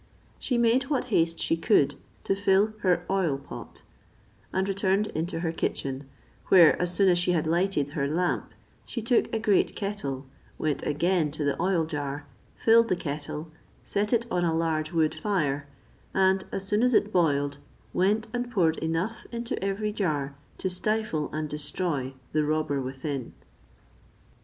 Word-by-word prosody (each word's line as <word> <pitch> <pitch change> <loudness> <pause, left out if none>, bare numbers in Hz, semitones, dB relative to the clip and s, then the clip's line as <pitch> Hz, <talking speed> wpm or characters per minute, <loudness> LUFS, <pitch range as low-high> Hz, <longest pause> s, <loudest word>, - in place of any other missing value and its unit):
She 250 - 0
made 235 +2 +3
what 270 -3 -1
haste 165 -1 +3
she - - +1
could 165 -5 +3 0.3
to 195 - +1
fill 200 +2 +3
her 180 -3 +1
oil 185 -8 +1
pot, 140 - -10 0.7
and 190 +1 0
returned 195 +1 +1
into 165 +1 -2
her 165 -2 0
kitchen; 135 -4 -3 0.4
where, 170 -4 +7
as 180 -1 +1
soon 195 +2 +3
as 175 -1 +4
she 180 0 +2
had 160 -3 +1
lighted 170 -3 +1
her 145 -1 -1
lamp, 175 +4 -1 0.3
she 240 - -5
took 235 +2 +2
a - - 0
great 215 -3 +2
kettle, 145 -10 -3 0.3
went 155 -2 -1
again 165 +2 +1
to 150 +1 -4
the 140 -1 0
oil 180 -3 +2
jar, 145 -2 -4 0.3
filled 230 0 +5
the 185 - +2
kettle, 150 0 -5 0.3
set 210 +1 0
it 235 -1 +2
on 175 -1 +1
a 165 -2 +1
large 160 -1 0
wood 160 -2 +2
fire, 155 -6 -1 0.5
and 190 0 +3
as 195 0 -4
soon 210 +2 +2
as 250 -1 +3
it 210 0 +2
boiled 145 -5 +2 0.3
went 210 +5 +2
and 245 0 -2
poured 170 -9 +2
enough 165 +8 -2
into 235 -4 -3
every 200 +2 -1
jar 150 -9 -1 0.2
to - - -2
stifle 185 -4 -1
and 155 0 -2
destroy 150 -2 -2 0.2
the 155 0 +2
robber 150 -2 0
within. 130 0 -4
175 Hz, 160 wpm, -27 LUFS, 150-200 Hz, 0.7 s, where